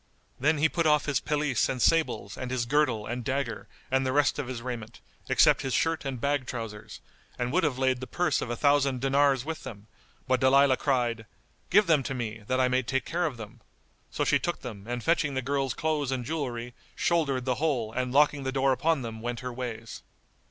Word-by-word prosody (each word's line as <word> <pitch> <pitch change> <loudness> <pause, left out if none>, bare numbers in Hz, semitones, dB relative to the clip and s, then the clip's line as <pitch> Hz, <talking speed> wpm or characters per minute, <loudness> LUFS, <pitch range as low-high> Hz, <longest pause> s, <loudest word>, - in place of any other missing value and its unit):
Then 150 +4 +2
he 155 +2 +4
put 165 0 0
off 150 -1 +3
his 145 -2 +1
pelisse 145 -5 0
and 130 - -2
sables 155 -9 +1
and 130 - -5
his 125 -2 -1
girdle 125 -5 +1
and 120 +1 -4
dagger 130 -1 -3 0.2
and 130 0 +2
the 130 - 0
rest 145 +2 +2
of 140 - -3
his 130 -2 -4
raiment, 120 -3 -6 0.3
except - - +5
his 135 -2 -1
shirt 165 -2 0
and 135 -3 -3
bag 140 -1 0
trousers, 115 -4 -7 0.4
and 125 0 -2
would 185 +1 +2
have 145 -5 0
laid 130 -1 +1
the 130 - -6
purse 175 -5 0
of - - -4
a 120 - -1
thousand 140 -1 +2
dinars 135 0 +2
with 160 0 -4
them, 100 -2 -9 0.4
but 130 -1 +2
Dalilah 130 +1 +5
cried, 120 -5 0 0.4
"Give 205 +3 +5
them 160 -5 +3
to 135 +1 -4
me, 115 -3 -4
that 130 0 +1
I 130 - +4
may 125 0 +2
take 130 +2 -2
care 175 +1 0
of 135 -6 -6
them." 110 -3 -10 0.5
So - - -1
she - - +3
took 175 - -3
them 105 -6 -8
and 120 -1 -3
fetching 160 -4 +1
the 130 - 0
girl's 135 -1 -1
clothes 150 -4 -1
and 125 -2 -2
jewellery 125 -5 -4 0.2
shouldered 140 -7 +1
the 130 -1 +1
whole 125 -9 0
and 125 0 -2
locking 145 +1 +3
the 130 -1 -2
door 135 0 +2
upon 155 +1 +1
them 110 -1 -6
went 120 +1 -4
her 125 -1 -5
ways. 115 -3 -6
130 Hz, 215 wpm, -28 LUFS, 120-145 Hz, 0.5 s, except